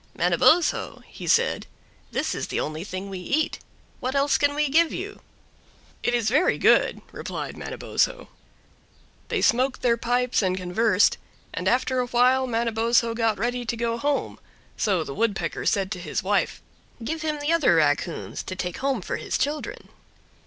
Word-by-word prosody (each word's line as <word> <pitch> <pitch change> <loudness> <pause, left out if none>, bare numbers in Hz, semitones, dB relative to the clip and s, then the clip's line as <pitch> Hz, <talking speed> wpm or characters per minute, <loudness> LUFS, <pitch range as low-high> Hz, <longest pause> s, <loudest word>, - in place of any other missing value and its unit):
"Manabozho," 340 +1 +3
he - - -9
said, - - +2 0.4
"this - - -1
is - - -3
the - - -2
only 155 +2 -3
thing 185 0 -6
we 190 -2 -6
eat; 285 - -1 0.4
what 260 +2 -3
else 280 0 +3
can 285 0 +2
we 300 0 +2
give 320 +4 +3
you?" 405 +3 -6 0.8
"It 240 - +1
is 235 -3 0
very 290 +10 +3
good," - - +3
replied - - -5
Manabozho. - - -2 1.0
They - - -1
smoked 255 +3 +2
their 235 -2 +3
pipes 245 +1 +1
and 185 -2 0
conversed, 195 +3 +2 0.3
and - - -3
after 255 +1 +2
a 250 - 0
while 255 +2 +3
Manabozho 230 0 +1
got 225 -2 +1
ready 245 +4 -1
to 235 0 -3
go 230 0 -1
home, 285 +2 -1 0.4
so 190 -6 +1
the 140 - -6
Woodpecker 215 +3 -1
said 195 -1 +1
to 180 - -3
his 175 - -3
wife, - - 0 0.4
"Give 320 +7 -3
him 305 -2 -2
the 295 +3 0
Other 300 - +4
raccoons 155 +2 0
to 185 - -6
take 180 -1 -4
home 265 -7 -1
for - - -3
his - - -2
children." 295 +2 -3
240 Hz, 165 wpm, -25 LUFS, 200-275 Hz, 1.0 s, Other